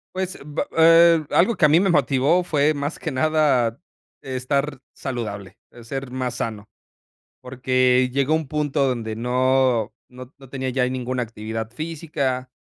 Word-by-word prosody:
Pues, 185 -1 -3
b 150 0 -3
eh, 165 0 +6
algo 200 +6 +3
que 155 - +3
a - - +5
mí 160 +3 +5
me 190 -2 +2
motivó 150 +4 +2
fue, 150 -2 +1
más 145 +2 -4
que 160 -6 -4
nada, 135 -5 +1 0.4
estar 135 +2 -2 0.2
saludable, 105 -6 -6
eh, 120 - -14
ser 135 +2 -5
más 125 -1 -3
sano, 105 -4 -5 0.7
porque, 130 0 +1
llegó 140 +3 +1
un 160 -3 -1
punto 150 -2 0
donde 115 -3 -3
no 125 -1 +1 0.2
no 125 +1 -12
no 135 -2 -15
tenía 130 -1 -3
ya 125 0 0
ninguna 130 -1 -2
actividad 110 0 -6
física, 140 -4 -3
130 Hz, 150 wpm, -22 LUFS, 125-150 Hz, 0.7 s, eh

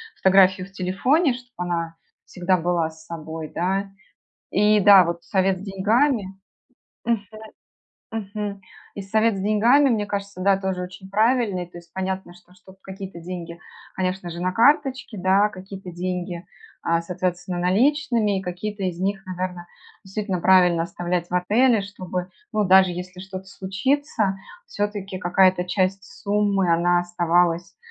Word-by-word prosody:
фотографию 190 -1 +4
в - - -21
телефоне, 225 - +1
чтобы 245 0 -12
она 165 -1 -2 0.3
всегда 180 0 0
была 170 -1 0
с 160 0 -16
собой, 160 -1 -7
да. 195 +3 -1 0.6
И, 210 +1 +4
да, 195 -2 +8
вот 170 0 -4
совет 190 +1 +1
с - - -9
деньгами. 215 +4 +1 0.8
Мгм, 225 -3 0 0.8
мгм. 205 -2 -5 0.4
И 200 - -4
совет 220 +2 +1
с - - -3
деньгами, 230 +8 +4
мне 210 -3 0
кажется, 200 -2 -5
да 195 0 +4
тоже 190 -2 -2
очень 185 +1 -9
правильный, 215 -3 +1
то 175 0 -12
есть 170 0 -17
понятно, 190 -1 -4
что, 180 0 -21
чтоб 185 +1 -18
какие-то 190 -2 -8
деньги, 170 -1 -7 0.4
конечно 185 -1 -2
же, 170 +1 -7
на 185 +1 0
карточке, 265 0 +2
да, 190 +3 +3
какие-то 190 -1 -9
деньги, 180 0 -4 0.4
а, 165 0 +1
соответственно, 180 0 -3
наличными 220 - +2
и - - -10
какие-то 195 +3 -5
из 180 -2 -3
них, 195 0 -1
наверное, 180 -1 -5 0.4
действительно 195 -1 -3
правильно 180 -2 +5
оставлять 175 +1 -3
в - - -4
отеле, 220 +6 +3
чтобы, 185 -2 -5 0.2
ну, 215 -2 +1
даже 190 0 +6
если 180 +1 -7
что-то 190 0 -8
случится 200 +2 -1 0.3
всё-таки, 205 - -4
какая-то 185 0 +3
часть 190 +1 0
суммы, 200 -2 0
она 175 +1 +3
оставалась, 175 0 +1
190 Hz, 145 wpm, -23 LUFS, 180-205 Hz, 0.8 s, да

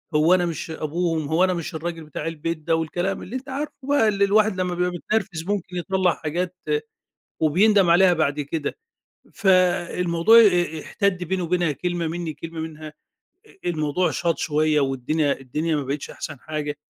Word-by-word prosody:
هو 155 +4 +5
أنا 180 -1 +3
مش 165 -1 -4
أبوهم، 160 0 -2
هو 160 +4 +2
أنا 185 -1 +3
مش 170 0 -5
الراجل 165 0 -4
بتاع 150 +1 -6
البيت 165 0 -3
ده، 155 +1 0
والكلام 175 +4 -2
اللي 250 - -7
أنت 260 +1 -6
عارفُه 285 +3 -4
بقى 285 -6 +3
اللي 200 -1 +2
الواحد 210 0 +3
لما 180 -1 -1
بيبقى 180 +1 0
متنرفز 180 -1 -2
ممكن 190 -2 -3
يطلّع 185 0 +1
حاجات 175 +3 -3 0.9
وبيندم 190 +4 +4
عليها 180 +1 +6
بعد 150 -3 0
كده، 145 +1 -4 0.6
فالموضوع 180 +1 +3
آآ، 175 -7 +3
احتدّ 185 -3 -1
بيني 185 +1 -2
وبينها 175 -2 +1
كلمة 175 +2 -2
منّي 165 -1 -4
كلمة 165 +1 -7
منها، 155 -1 -7 0.6
أ 390 - -8
الموضوع 160 +2 0
شاط 170 -2 -1
شويّة 155 0 +2
والدنيا 140 +2 0
الدنيا 150 +5 -1
ما 145 - -2
بقِتش 140 +2 -4
أحسن 145 -3 -7
حاجة، 150 -1 -4
170 Hz, 165 wpm, -23 LUFS, 155-185 Hz, 0.9 s, عليها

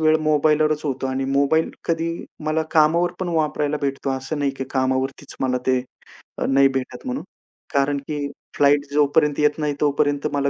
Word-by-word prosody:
वेळ 155 0 +4
मोबाईलवरच 155 0 +2
होतो 135 -2 -2
आणि 130 0 -2
मोबाईल 140 +4 +2
कधी 165 0 0 0.4
मला 155 +1 +1
कामावर 165 +3 +3
पण 185 - -2
वापरायला 150 -2 0
भेटतो 135 0 -1
असं 130 +3 -3
नाही, 140 -1 +1
की 135 0 -5
कामावरतीच 130 0 -1
मला 125 -1 +1
ते 130 -1 +3 0.6
अ, - - -1
नाही 135 0 +5
भेटत 135 - -4
म्हणून 260 +1 -3 0.5
कारण 140 +1 +2
की 145 -2 -2 0.3
फ्लाइट 145 0 +4
जोपर्यंत 150 0 +3
येत 150 +1 +2
नाही 150 -1 0
तोपर्यंत 145 0 +1
मला 140 0 +1
145 Hz, 165 wpm, -22 LUFS, 135-155 Hz, 0.6 s, नाही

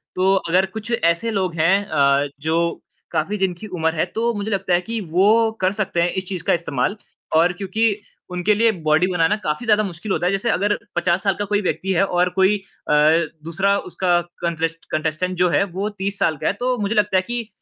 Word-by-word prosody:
तो 190 +1 +3 0.2
अगर 185 +3 +3
कुछ 220 +4 -7
ऐसे 170 +1 +1
लोग 185 -4 -1
हैं 165 +4 +4
अ, 140 -3 +2
जो 160 +2 -1 0.6
काफ़ी 200 +7 -1
जिनकी 190 +2 -2
उम्र 160 0 +1
है 155 - +1
तो 235 +1 +1
मुझे 210 0 -4
लगता 195 -2 0
है 175 - +3
कि 230 - -2
वो 190 +5 +4 0.3
कर 185 +1 +3
सकते 175 -3 0
हैं 175 - +2
इस - - -16
चीज़ 180 -3 -4
का - - +5
इस्तेमाल। 170 +2 -1 0.4
और 170 +3 +4
क्योंकि 195 +4 -3 0.5
उनके 180 +4 +2
लिए 225 +1 +4 0.2
बॉडी 160 +4 +4
बनाना 175 +3 +2
काफ़ी 155 +11 -2
ज़्यादा 215 -1 +3
मुश्किल 190 +1 -6
होता 175 - 0
है। 180 - +2
जैसे 195 +4 0
अगर 205 0 +1 0.2
50 175 +2 +1
साल 195 - +2
का 205 - -3
कोई 205 - +2
व्यक्ति 190 0 -2
है 180 - +3
और 180 -1 +1
कोई 195 +2 +4 0.3
अ, - - +3 0.5
दूसरा 195 +5 +1
उसका 175 -1 +2 0.2
कंट्रेस्ट 165 -1 -2
कंटेस्टेंट 155 +4 -1
जो 180 0 +3
है 170 - +3
वो 205 +2 -1
30 200 0 -2
साल 155 -2 +1
का - - -3
है - - +2
तो 255 -1 +1
मुझे 205 +2 -1
लगता 205 -2 +2
है 185 - +3
कि 240 -2 -3
185 Hz, 215 wpm, -21 LUFS, 170-205 Hz, 0.6 s, का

